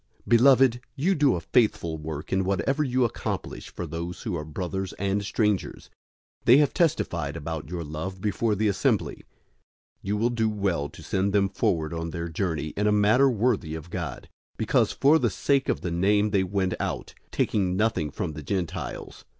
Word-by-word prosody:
001:005 -, -, -14 dB
Beloved, 125 Hz, 0 st, +5 dB
you 165 Hz, +8 st, +2 dB
do 145 Hz, -, +3 dB
a -, -, -2 dB
faithful 85 Hz, -4 st, +1 dB
work 75 Hz, 0 st, -6 dB
in 95 Hz, 0 st, +2 dB
whatever 100 Hz, -, 0 dB
you 130 Hz, -2 st, +2 dB
accomplish 115 Hz, -, -4 dB
for -, -, -6 dB
those 85 Hz, +1 st, -6 dB
who 105 Hz, -6 st, -2 dB
are 75 Hz, -, -3 dB
brothers 90 Hz, +5 st, -4 dB
and 100 Hz, +1 st, -1 dB
strangers. 105 Hz, -1 st, -1 dB, 0.5 s
001:006 -, -, -40 dB
They 125 Hz, -, +8 dB
have 145 Hz, -1 st, +3 dB
testified 170 Hz, -, 0 dB
about 80 Hz, -1 st, -5 dB
your 85 Hz, -1 st, -4 dB
love 80 Hz, +5 st, -5 dB
before 105 Hz, +2 st, 0 dB
the 110 Hz, +2 st, +1 dB
assembly. 95 Hz, -1 st, 0 dB, 0.8 s
You 100 Hz, +2 st, -2 dB
will 115 Hz, +3 st, +1 dB
do 110 Hz, -2 st, +1 dB
well 95 Hz, -9 st, -1 dB
to -, -, -13 dB
send 95 Hz, +1 st, 0 dB
them 100 Hz, -1 st, +3 dB
forward 85 Hz, -4 st, 0 dB
on 85 Hz, 0 st, -3 dB
their 85 Hz, 0 st, -4 dB
journey 80 Hz, -2 st, -2 dB
in 105 Hz, +7 st, -1 dB
a -, -, +4 dB
manner 105 Hz, +7 st, +4 dB
worthy 110 Hz, -9 st, 0 dB
of 80 Hz, +2 st, -9 dB
God, 80 Hz, -8 st, -4 dB, 0.3 s
001:007 -, -, -39 dB
because -, -, +2 dB
for 150 Hz, +4 st, +4 dB
the -, -, +2 dB
sake 140 Hz, -2 st, +1 dB
of -, -, 0 dB
the 90 Hz, -, -3 dB
Name 100 Hz, +4 st, +2 dB
they 100 Hz, -2 st, +3 dB
went 95 Hz, 0 st, -1 dB
out, -, -, -3 dB, 0.2 s
taking 95 Hz, -3 st, 0 dB
nothing 105 Hz, -8 st, +1 dB
from 80 Hz, +2 st, -4 dB
the 75 Hz, -, -7 dB
Gentiles. 90 Hz, +2 st, -4 dB
95 Hz, 190 wpm, -26 LUFS, 85-110 Hz, 0.8 s, They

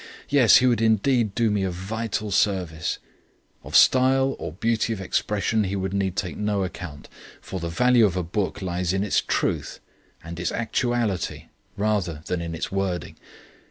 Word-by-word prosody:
Yes, 135 Hz, -5 st, +6 dB
he 130 Hz, -, +3 dB
would 120 Hz, -3 st, +2 dB
indeed 110 Hz, 0 st, +2 dB
do 115 Hz, -3 st, +2 dB
me 105 Hz, -1 st, 0 dB
a 95 Hz, -, 0 dB
vital 105 Hz, +4 st, -4 dB
service! 90 Hz, -6 st, 0 dB, 0.7 s
Of -, -, -6 dB
style 135 Hz, +1 st, +5 dB
or -, -, -5 dB
beauty 115 Hz, +4 st, 0 dB
of 105 Hz, -, -6 dB
expression 105 Hz, +2 st, 0 dB
he 95 Hz, +1 st, -2 dB
would 95 Hz, 0 st, -3 dB
need 95 Hz, -2 st, -1 dB
to -, -, 0 dB
take 90 Hz, -, -7 dB
no 105 Hz, -2 st, 0 dB
account, 90 Hz, -5 st, -7 dB, 0.3 s
for 95 Hz, -, -6 dB
the 85 Hz, 0 st, -4 dB
value 120 Hz, +4 st, +4 dB
of 95 Hz, -2 st, -3 dB
a 90 Hz, -, 0 dB
book 95 Hz, +3 st, -3 dB
lies 90 Hz, -1 st, -1 dB
in 95 Hz, +1 st, 0 dB
its 105 Hz, -, +2 dB
truth -, -, -2 dB, 0.4 s
and 85 Hz, +1 st, -8 dB
its 90 Hz, -, -1 dB
actuality 115 Hz, -3 st, -1 dB, 0.3 s
rather 100 Hz, -7 st, -1 dB
than 90 Hz, -1 st, -2 dB
in 85 Hz, -1 st, -4 dB
its -, -, -4 dB
wording. 95 Hz, -2 st, -2 dB
100 Hz, 175 wpm, -24 LUFS, 90-115 Hz, 0.7 s, Yes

